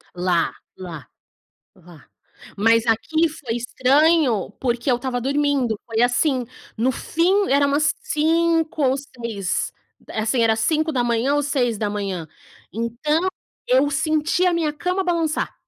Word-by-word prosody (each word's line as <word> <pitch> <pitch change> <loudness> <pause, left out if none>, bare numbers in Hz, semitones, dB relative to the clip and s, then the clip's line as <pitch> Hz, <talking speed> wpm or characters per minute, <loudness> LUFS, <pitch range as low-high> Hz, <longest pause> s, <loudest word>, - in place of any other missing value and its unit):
Lá, 175 -2 0 0.2
lá, 165 -8 -8 0.7
lá. 175 -3 -17 0.5
Mas 230 +2 +3
aqui 315 +9 +2
foi 250 -6 -5
estranho 260 - +2
porque 245 +1 -1
eu - - +4
estava 245 -1 -3
dormindo, 275 -5 0
foi 225 0 -1
assim, 250 +1 +2 0.3
no 245 +4 +2
fim 370 - +1
era 280 0 +4
umas 285 +1 +2
5 325 0 +1
ou 260 0 +3
6, 235 -9 -4 0.4
assim 225 +3 0
era 225 -1 +3
5h00 260 -1 +1
ou 290 - +1
6h00. 210 - -2 0.5
Então, 265 - -1 0.4
eu 265 +3 +3
senti 310 +4 +1
a 355 - +2
minha 320 -3 0
cama 360 +5 -1
balançar. 335 -4 -1
260 Hz, 125 wpm, -22 LUFS, 225-310 Hz, 0.7 s, eu